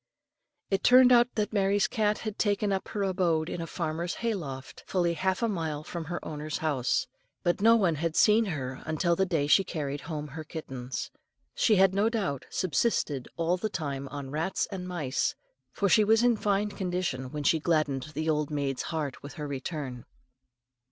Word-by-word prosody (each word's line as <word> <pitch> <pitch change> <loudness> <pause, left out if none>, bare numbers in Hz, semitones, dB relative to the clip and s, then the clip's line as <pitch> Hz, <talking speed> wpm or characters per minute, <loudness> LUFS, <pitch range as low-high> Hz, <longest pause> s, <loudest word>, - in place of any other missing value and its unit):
It 195 0 +1
turned 255 0 +7
out 240 0 +5
that 210 0 -1
Mary's 200 0 +2
cat 215 -3 +1
had 215 -1 -6
taken 205 -1 +1
up 190 - -2
her 205 -2 -2
abode 175 -4 +1
in 175 - -4
a 165 - -4
farmer's 170 +1 -3
hay 230 -1 -1
loft, 135 -9 -7
fully 175 -2 +1
half 190 +5 0
a - - +3
mile 160 -7 -2
from 170 +1 -6
her 175 +2 -3
owner's 150 0 -4
house; 145 -6 0 0.4
but 175 +3 +1
no 230 +2 +7
one 190 -7 +3
had 160 +1 -2
seen 220 +2 +5
her 130 -8 -4
until 170 +2 +1
the 190 +2 +1
day 160 -5 +1
she 170 +6 +5
carried 145 -5 -4
home 150 -2 -5
her 155 +4 -7
kittens. 135 -5 -6 0.4
She 220 - +3
had 190 -1 +5
no 205 +3 +3
doubt 190 - -2
subsisted 160 - 0
all 170 +2 +1
the 215 +4 -2
time 140 -7 -4
on 140 -1 -7
rats 160 +6 -1
and 185 -2 -5
mice, 155 -7 -1 0.4
for 200 - 0
she 215 +3 +5
was 220 +2 +4
in 245 -1 +4
fine 205 0 0
condition 180 -10 -2
when 150 -1 -4
she 160 +3 +3
gladdened 155 -5 +1
the 155 +1 -2
old 150 -2 +1
maid's 140 -3 -1
heart 155 -5 -3
with 145 0 -9
her 150 -1 -5
return. 135 -3 -5
170 Hz, 190 wpm, -28 LUFS, 150-200 Hz, 0.4 s, turned